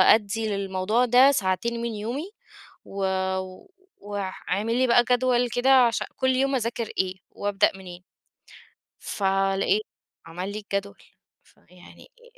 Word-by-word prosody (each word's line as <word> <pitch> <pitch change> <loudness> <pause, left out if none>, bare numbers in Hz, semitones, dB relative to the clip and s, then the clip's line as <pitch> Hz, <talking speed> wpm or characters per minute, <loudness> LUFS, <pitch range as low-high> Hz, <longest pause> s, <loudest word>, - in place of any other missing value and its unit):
أدّي 220 +1 -3
للموضوع 200 +4 0
ده 250 +3 +6
ساعتين 235 +2 -1
من 235 -1 -3
يومي 255 - -5 0.5
و - - -13 1.1
واع 200 -2 -4 0.2
واعمل 215 +5 0
لي 255 +1 +2
بقى 240 0 +5
جدول 245 -1 +2
كده 245 +3 0 0.2
عشان 230 - -2
كل 260 -1 0
يوم 270 +1 +1
أذاكر 230 -2 -2
إيه؟ 190 0 0 0.2
وابدأ 205 -1 +1
منين؟" 180 -1 -11 1.0
فلقيت 195 +1 0 0.4
عمل 180 +4 -6
لي 215 - -4
الجدول، 200 -1 -5 0.4
فيعني 180 0 -19
أ 480 - -23
215 Hz, 125 wpm, -25 LUFS, 195-245 Hz, 1.1 s, ده